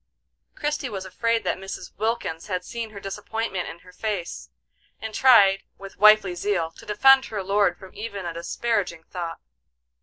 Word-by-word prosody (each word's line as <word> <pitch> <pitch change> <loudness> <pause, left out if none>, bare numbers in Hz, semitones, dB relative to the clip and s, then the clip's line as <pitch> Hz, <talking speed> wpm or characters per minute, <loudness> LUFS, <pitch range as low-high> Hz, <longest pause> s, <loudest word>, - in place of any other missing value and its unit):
Christie 295 -3 -2
was 195 -3 -5
afraid 230 +5 0
that - - -1
Mrs. 195 0 -8
Wilkins 215 -6 -2
had 180 -2 -3
seen 230 -1 -5
her 210 -2 -9
disappointment 200 -1 -4
in - - -8
her 180 - -14
face, 200 -3 -4 0.5
and 220 0 -6
tried, 200 -7 +6 0.2
with 195 -1 -11
wifely 215 -3 +6
zeal, 175 -2 -1
to - - -15
defend 265 +6 +6
her 205 -3 -4
lord 195 -2 +2
from 190 - -13
even 200 -3 -6
a 170 - -3
disparaging 170 0 -2
thought. 170 -1 -6
200 Hz, 160 wpm, -25 LUFS, 180-220 Hz, 0.5 s, tried